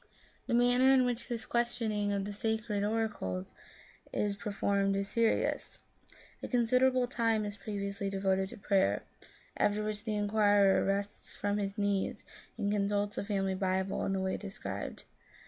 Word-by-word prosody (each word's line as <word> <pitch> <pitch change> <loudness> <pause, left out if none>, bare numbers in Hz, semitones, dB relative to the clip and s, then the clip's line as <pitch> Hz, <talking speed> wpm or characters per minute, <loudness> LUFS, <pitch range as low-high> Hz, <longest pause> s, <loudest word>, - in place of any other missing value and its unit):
The 240 - +1
manner 245 +2 +5
in 260 -1 +5
which 245 -1 -2
this 230 -2 -3
questioning 225 -4 0
of 200 -1 -1
the 205 - -4
sacred 220 -1 -1
oracles 210 - -2 0.6
is 205 -1 0
performed 200 -1 0
is 195 0 -1
serious. 230 -1 0 0.6
A - - -4
consider 250 +1 +3
able 255 -1 +2
time 230 -3 +1
is 205 -1 -4
previously 200 -1 -4
devoted 190 -1 0
to - - -9
prayer, 190 - +2 0.5
after 210 +1 +2
which 210 -1 -3
the 220 -2 -2
inquirer 205 -1 +4
rises 200 +1 -3
from 205 0 -1
his 200 -1 -3
knees 200 -1 0 0.3
and 205 -2 0
consults 205 0 0
the - - -1
family 195 -2 0
Bible 190 0 -1
in 195 - 0
the 190 - 0
way 190 0 -1
described. 100 - -6
205 Hz, 155 wpm, -32 LUFS, 195-225 Hz, 0.6 s, manner